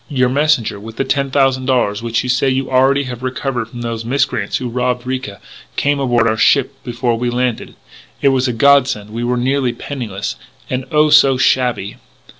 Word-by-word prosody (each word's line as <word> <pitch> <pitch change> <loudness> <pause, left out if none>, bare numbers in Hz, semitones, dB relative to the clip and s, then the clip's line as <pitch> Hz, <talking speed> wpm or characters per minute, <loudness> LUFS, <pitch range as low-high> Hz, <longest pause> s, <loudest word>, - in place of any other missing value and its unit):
Your 130 -4 +1
messenger, 140 -6 +1
with 110 +2 -10
the - - +1
ten 140 0 -1
thousand 135 -1 +1
dollars 115 -6 +1
which 115 0 -1
you - - -4
say 130 +2 +2
you 130 0 -1
already 135 +2 +3
have 125 -2 -7
recovered 130 -2 -3
from 120 +1 -9
those 115 -1 -4
miscreants 120 -4 -1
who 125 - -4
robbed 125 0 -2
Ricca, 130 -6 -4 0.4
came 145 0 +1
aboard 120 -4 +2
our 110 - 0
ship 135 +2 +2
before 120 -1 -1
we 120 0 -1
landed. 125 -1 -2 0.4
It 140 - +3
was 130 0 +1
a - - 0
godsend; 130 -4 +3
we 115 +2 -4
were 125 +1 0
nearly 130 0 0
penniless, 115 -6 -5 0.3
and 130 0 -2
oh, 150 -1 +3
so 140 -3 +6
shabby! 125 -5 0
125 Hz, 190 wpm, -17 LUFS, 120-135 Hz, 0.4 s, so